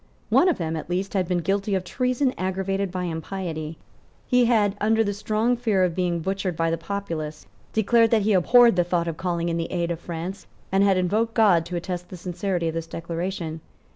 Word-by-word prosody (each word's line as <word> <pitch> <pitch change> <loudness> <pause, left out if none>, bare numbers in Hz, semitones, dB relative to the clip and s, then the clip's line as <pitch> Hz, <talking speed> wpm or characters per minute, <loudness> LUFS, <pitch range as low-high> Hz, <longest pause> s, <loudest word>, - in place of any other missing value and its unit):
One 365 - +5
of 350 - +1
them 165 -2 -2
at 160 - -6
least 185 +2 -2
had 185 -3 0
been 180 -1 0
guilty 200 +1 0
of 190 - -1
treason 255 +6 0
aggravated 190 +1 -1
by 180 0 -3
impiety. 160 -2 -4 0.5
He 250 -1 +3
had, 215 -4 +3
under 220 +1 +3
the 205 -1 -1
strong 215 +4 0
fear 220 -6 +1
of 180 -2 +1
being 175 -1 -1
butchered 190 0 -2
by 165 0 +1
the 165 - 0
populace, 165 -4 -5 0.3
declared 225 +1 +3
that 220 -2 +3
he 215 +1 +2
abhorred 235 +3 +6
the 175 - +4
thought 175 -1 0
of 165 -2 -3
calling 170 -2 -1
in 170 -1 -1
the 165 - -3
aid 170 -1 -1
of 165 - -3
France, 170 +3 -6 0.2
and 195 +1 +3
had 195 -2 +4
invoked 215 +5 0
God 185 -7 +4
to 180 - -5
attest 180 0 -4
the 185 - -8
sincerity 180 0 -2
of 160 - -1
this 165 0 -4
declaration. 165 0 -4
185 Hz, 210 wpm, -24 LUFS, 170-205 Hz, 0.5 s, abhorred